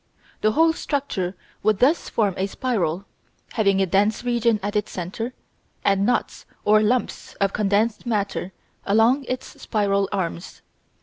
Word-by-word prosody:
The 215 Hz, 0 st, +3 dB
whole 325 Hz, +3 st, +4 dB
structure 265 Hz, -, -2 dB, 0.3 s
would 215 Hz, -1 st, +2 dB
thus 280 Hz, -, +2 dB
form 205 Hz, -4 st, +1 dB
a 190 Hz, -, -1 dB
spiral, 195 Hz, -6 st, -1 dB, 0.5 s
having 200 Hz, -4 st, +2 dB
a 195 Hz, -, +3 dB
dense 205 Hz, +5 st, +1 dB
region 235 Hz, -2 st, +2 dB
at 205 Hz, +1 st, -3 dB
its 210 Hz, -, 0 dB
centre 190 Hz, +7 st, -4 dB, 0.5 s
and 195 Hz, +1 st, +3 dB
knots 245 Hz, -, -1 dB, 0.2 s
or 215 Hz, +1 st, +5 dB
lumps 240 Hz, +4 st, -1 dB
of 195 Hz, -1 st, 0 dB
condensed 210 Hz, +3 st, +1 dB
matter 200 Hz, -4 st, -1 dB, 0.3 s
along 230 Hz, +7 st, +3 dB
its 255 Hz, +1 st, -6 dB
spiral 200 Hz, -2 st, +1 dB
arms. 180 Hz, -3 st, -4 dB
210 Hz, 140 wpm, -23 LUFS, 195-235 Hz, 0.5 s, or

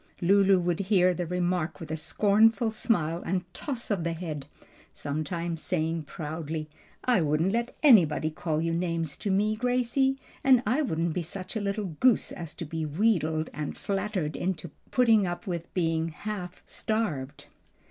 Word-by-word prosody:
Lulu 195 Hz, +1 st, +5 dB
would 175 Hz, -1 st, 0 dB
hear 185 Hz, -2 st, +3 dB
the 175 Hz, -1 st, -3 dB
remark 180 Hz, -1 st, -1 dB
with 160 Hz, -3 st, -7 dB
a -, -, 0 dB
scornful 210 Hz, -, +3 dB
smile 175 Hz, -7 st, 0 dB
and 180 Hz, 0 st, -1 dB
toss 255 Hz, -6 st, -5 dB
of 190 Hz, -5 st, 0 dB
the 170 Hz, 0 st, -1 dB
head, 155 Hz, -5 st, -5 dB, 0.4 s
sometimes 165 Hz, +3 st, -3 dB
saying 165 Hz, -2 st, -1 dB
proudly, 155 Hz, 0 st, -5 dB, 0.4 s
"I 245 Hz, -7 st, +4 dB
wouldn't 155 Hz, +4 st, +2 dB
let 235 Hz, +2 st, -1 dB
anybody 165 Hz, -, +5 dB
call 155 Hz, 0 st, -2 dB
you 165 Hz, 0 st, 0 dB
names 165 Hz, -3 st, -1 dB
to 205 Hz, -, -3 dB
me, 210 Hz, +3 st, +2 dB
Gracie; 250 Hz, +3 st, +1 dB, 0.3 s
and 255 Hz, -2 st, +5 dB
I 250 Hz, +9 st, +2 dB
wouldn't 165 Hz, -, 0 dB
be 180 Hz, -, -1 dB
such 185 Hz, +5 st, -6 dB
a 220 Hz, -, -1 dB
little 200 Hz, +1 st, -1 dB
goose 255 Hz, -3 st, +3 dB
as 165 Hz, -3 st, -7 dB
to 170 Hz, -, -5 dB
be 160 Hz, +1 st, -4 dB
wheedled 160 Hz, -2 st, +1 dB
and 150 Hz, -1 st, -4 dB
flattered 195 Hz, -6 st, -2 dB
into 175 Hz, -2 st, -3 dB, 0.2 s
putting 225 Hz, -6 st, +4 dB
up 175 Hz, +5 st, -4 dB
with 170 Hz, -3 st, -4 dB
being 165 Hz, -2 st, +1 dB
half 180 Hz, +2 st, -6 dB
starved." 150 Hz, -12 st, -3 dB
175 Hz, 160 wpm, -28 LUFS, 160-210 Hz, 0.4 s, Lulu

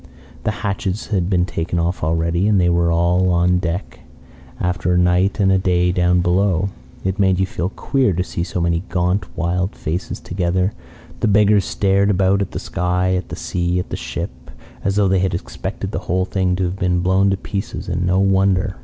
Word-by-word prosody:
"The -, -, +2 dB, 0.2 s
hatches 100 Hz, 0 st, -2 dB
had 95 Hz, -4 st, 0 dB
been 90 Hz, -2 st, +2 dB
taken 85 Hz, -1 st, -3 dB
off 85 Hz, +1 st, -1 dB
already, 85 Hz, +4 st, +1 dB
and 105 Hz, -2 st, +3 dB
they 90 Hz, -1 st, +3 dB
were 85 Hz, 0 st, +2 dB
all 90 Hz, +2 st, +2 dB
on 90 Hz, 0 st, +3 dB
deck 90 Hz, +2 st, -4 dB, 0.6 s
after 90 Hz, 0 st, -1 dB
a 90 Hz, -, +3 dB
night 90 Hz, +4 st, +2 dB
and 95 Hz, -1 st, +4 dB
a 95 Hz, -, +3 dB
day 90 Hz, -1 st, +2 dB
down 90 Hz, 0 st, +2 dB
below. 95 Hz, +1 st, +1 dB, 0.3 s
It 95 Hz, +2 st, -2 dB
made 95 Hz, -2 st, +3 dB
you 95 Hz, -, +3 dB
feel 90 Hz, -1 st, -3 dB
queer 130 Hz, +3 st, 0 dB
to 90 Hz, +2 st, 0 dB
see 85 Hz, -, -4 dB
so 90 Hz, 0 st, -4 dB
many 85 Hz, -1 st, +1 dB
gaunt, 90 Hz, +1 st, 0 dB
wild 90 Hz, +4 st, -1 dB
faces 90 Hz, +9 st, -4 dB
together. 90 Hz, +2 st, -1 dB, 0.5 s
The -, -, +1 dB
beggars 105 Hz, -1 st, +4 dB
stared 100 Hz, 0 st, +2 dB
about 100 Hz, 0 st, +2 dB
at 100 Hz, -, -2 dB
the -, -, -6 dB
sky, 90 Hz, +1 st, 0 dB
at 90 Hz, -, -3 dB
the -, -, -5 dB
sea, 90 Hz, 0 st, -1 dB
at 90 Hz, -, -3 dB
the -, -, -1 dB
ship, -, -, -6 dB, 0.3 s
as 100 Hz, 0 st, 0 dB
though 100 Hz, -1 st, +3 dB
they 95 Hz, 0 st, +2 dB
had 95 Hz, -1 st, 0 dB
expected 85 Hz, -, -5 dB
the -, -, -2 dB
whole 90 Hz, +2 st, +1 dB
thing 95 Hz, -2 st, 0 dB
to 95 Hz, -, -1 dB
have 90 Hz, +2 st, -2 dB
been 90 Hz, -2 st, +1 dB
blown 95 Hz, +2 st, +3 dB
to 95 Hz, -, +1 dB
pieces. 100 Hz, +1 st, -5 dB
And 90 Hz, 0 st, -1 dB
no 90 Hz, +1 st, +2 dB
wonder! 95 Hz, 0 st, +2 dB
90 Hz, 205 wpm, -19 LUFS, 90-95 Hz, 0.6 s, and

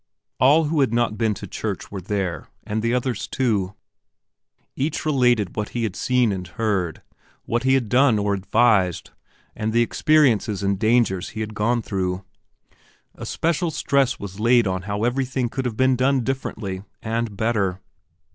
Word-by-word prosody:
All 145 Hz, +6 st, +5 dB
who 155 Hz, 0 st, 0 dB
had 135 Hz, -5 st, +3 dB
not 120 Hz, -2 st, +1 dB
been 110 Hz, -2 st, 0 dB
to 100 Hz, -, -8 dB
church 105 Hz, -4 st, -5 dB
were 100 Hz, -2 st, -5 dB
there, 95 Hz, -2 st, -3 dB, 0.2 s
and 110 Hz, +1 st, -2 dB
the 115 Hz, +1 st, 0 dB
others 125 Hz, -2 st, -1 dB
too. 105 Hz, -7 st, -1 dB, 1.0 s
Each 150 Hz, +3 st, -2 dB
related 125 Hz, -, +2 dB
what 105 Hz, -1 st, -3 dB
he 120 Hz, -, 0 dB
had 105 Hz, -4 st, -2 dB
seen 125 Hz, -2 st, +2 dB
and 90 Hz, -2 st, -4 dB
heard, 95 Hz, -3 st, -2 dB, 0.4 s
what 120 Hz, +1 st, -1 dB
he 130 Hz, 0 st, +4 dB
had 125 Hz, -4 st, 0 dB
done 125 Hz, 0 st, +4 dB
or 100 Hz, 0 st, 0 dB
advised, 100 Hz, -2 st, +2 dB, 0.4 s
and 110 Hz, +1 st, -2 dB
the 120 Hz, +1 st, +3 dB
experiences 120 Hz, -, +2 dB
and 100 Hz, -1 st, 0 dB
dangers 110 Hz, -4 st, +2 dB
he 110 Hz, -, -6 dB
had 110 Hz, 0 st, -4 dB
gone 115 Hz, +3 st, 0 dB
through. 95 Hz, -2 st, -2 dB, 0.9 s
Especial 170 Hz, +1 st, -1 dB
stress 140 Hz, -3 st, +1 dB
was 100 Hz, 0 st, -8 dB
laid 120 Hz, +1 st, +4 dB
on 95 Hz, -1 st, -1 dB
how 100 Hz, +1 st, -2 dB
everything 130 Hz, 0 st, 0 dB
could 130 Hz, +2 st, -4 dB
have 115 Hz, -3 st, -3 dB
been 130 Hz, 0 st, +3 dB
done 130 Hz, 0 st, +2 dB
differently 110 Hz, -7 st, -4 dB, 0.2 s
and 115 Hz, -2 st, -2 dB
better. 105 Hz, -5 st, 0 dB
115 Hz, 165 wpm, -22 LUFS, 100-125 Hz, 1.0 s, All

